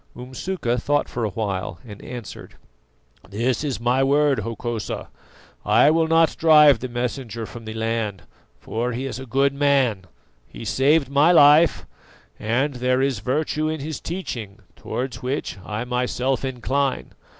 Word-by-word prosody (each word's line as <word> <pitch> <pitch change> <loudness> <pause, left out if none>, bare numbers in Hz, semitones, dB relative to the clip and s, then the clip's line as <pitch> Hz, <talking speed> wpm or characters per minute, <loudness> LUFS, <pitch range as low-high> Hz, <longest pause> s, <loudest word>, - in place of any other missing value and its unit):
Umsuka 125 +1 -3
thought 145 +2 +1
for 120 - -4
a 110 - 0
while 100 -1 -3
and 105 -3 -11
answered: 120 -3 -9 0.7
"This 120 +6 -1
is 140 -4 -2
my 125 +3 +2
word, 140 0 +3
Hokosa: 115 -1 -4 0.5
I 150 - +5
will 165 0 +2
not 165 0 +3
drive 150 -5 +6
the 130 +3 -5
Messenger 120 -1 -4
from 115 +1 -10
the 110 0 -6
land, 110 -4 -2 0.4
for 120 - -3
he 125 +3 -4
is 130 -2 -5
a 130 - -9
good 135 +3 +2
man; 135 -9 +1 0.4
he - - -10
saved 145 +2 +2
my 140 +5 +4
life, 155 0 +6 0.5
and 130 +7 0
there 125 +1 0
is 135 -6 0
virtue 155 +6 -1
in 155 0 -3
his 150 0 -5
teaching, 115 - -6
towards 125 -2 -5
which 130 -5 -3
I 105 +2 -4
myself 125 +1 -1
incline. 135 +1 -2
130 Hz, 150 wpm, -22 LUFS, 115-145 Hz, 0.7 s, drive